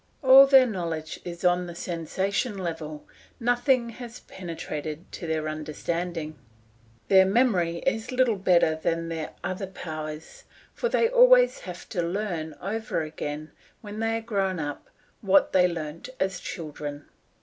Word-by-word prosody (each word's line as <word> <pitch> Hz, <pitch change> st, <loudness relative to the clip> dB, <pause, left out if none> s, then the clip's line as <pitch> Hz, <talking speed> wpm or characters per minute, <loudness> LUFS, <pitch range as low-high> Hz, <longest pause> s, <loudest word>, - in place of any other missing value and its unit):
All 265 Hz, +1 st, +9 dB
their 270 Hz, -1 st, +7 dB
knowledge 165 Hz, -8 st, -4 dB
is 175 Hz, 0 st, -6 dB
on 180 Hz, 0 st, +3 dB
the 170 Hz, -, -8 dB
sensation 190 Hz, +6 st, -2 dB
level, 160 Hz, -4 st, -5 dB, 0.3 s
nothing 245 Hz, 0 st, +2 dB
has 240 Hz, +1 st, -9 dB
penetrated 160 Hz, -2 st, -6 dB
to 170 Hz, -, -6 dB
their 155 Hz, -1 st, -1 dB
understanding. 155 Hz, 0 st, -4 dB, 0.7 s
Their 190 Hz, -1 st, +6 dB
memory 190 Hz, -7 st, +2 dB
is 225 Hz, -3 st, -1 dB
little 250 Hz, -4 st, +2 dB
better 180 Hz, -4 st, +4 dB
than 165 Hz, +1 st, -2 dB
their 160 Hz, -2 st, -4 dB
other 185 Hz, +1 st, -3 dB
powers, 155 Hz, -3 st, -7 dB, 0.3 s
for 480 Hz, -, -1 dB
they 460 Hz, -, +3 dB
always -, -, +6 dB
have -, -, -9 dB
to 180 Hz, -, -1 dB
learn 170 Hz, -3 st, -3 dB
over 215 Hz, -4 st, -2 dB
again, 155 Hz, -1 st, -6 dB, 0.3 s
when 210 Hz, 0 st, -8 dB
they 225 Hz, 0 st, 0 dB
are -, -, -5 dB
grown 195 Hz, -5 st, -1 dB
up, 145 Hz, -1 st, -5 dB, 0.3 s
what 195 Hz, -1 st, +4 dB
they 180 Hz, -1 st, +5 dB
learnt 165 Hz, +3 st, -6 dB
as 190 Hz, -1 st, -1 dB
children. 150 Hz, -4 st, -6 dB
180 Hz, 140 wpm, -26 LUFS, 160-225 Hz, 0.7 s, All